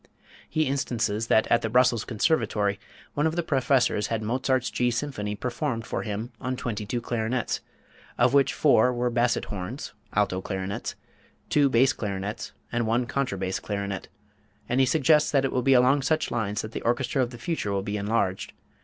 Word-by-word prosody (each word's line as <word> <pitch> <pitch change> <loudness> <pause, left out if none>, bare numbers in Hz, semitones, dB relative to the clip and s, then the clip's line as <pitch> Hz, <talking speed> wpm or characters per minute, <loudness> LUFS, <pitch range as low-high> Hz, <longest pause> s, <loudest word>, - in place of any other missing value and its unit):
He 155 - +1
instances 115 -5 -1
that 110 - +4
at 115 - +5
the 115 - -2
Brussels 125 -1 +3
Conservatory 105 - +1 0.3
one 145 +2 +2
of 160 - -2
the 175 - 0
professors 130 -7 +2
had 115 -1 -2
Mozart's 130 +3 0
G 125 - 0
minor 120 - +3
symphony 115 -6 -3
performed 120 0 -3
for - - -3
him 110 +3 -4
on 130 0 -2
twenty 110 -4 -4
two 120 +3 -2
clarinets, 115 +1 -1 0.6
of 120 +2 +3
which 140 -1 +4
four 125 -4 +4
were 120 0 -1
basset 120 0 +1
horns 100 +8 -6 0.2
(alto 100 -3 +1
clarinets), 95 0 -4 0.6
two 145 -2 +4
brass 130 +1 +4
clarinets, 100 +1 -4 0.2
and 120 -1 0
one 120 +2 +1
contra 130 -5 -2
bass 95 0 -2
clarinet; 100 -2 -4 0.6
and 125 - +1
he 130 - +4
suggests 150 +1 +4
that 135 -2 +2
it 135 - -1
will 125 - +1
be 135 +1 +4
along 130 +3 +5
such 155 +3 0
lines 105 -2 -1
that 110 - -6
the - - -5
orchestra 120 +3 0
of 125 - 0
the 120 - -10
future 120 -5 -2
will 100 -1 -1
be 105 +1 -3
enlarged. 100 -2 -1
120 Hz, 185 wpm, -26 LUFS, 105-130 Hz, 0.6 s, at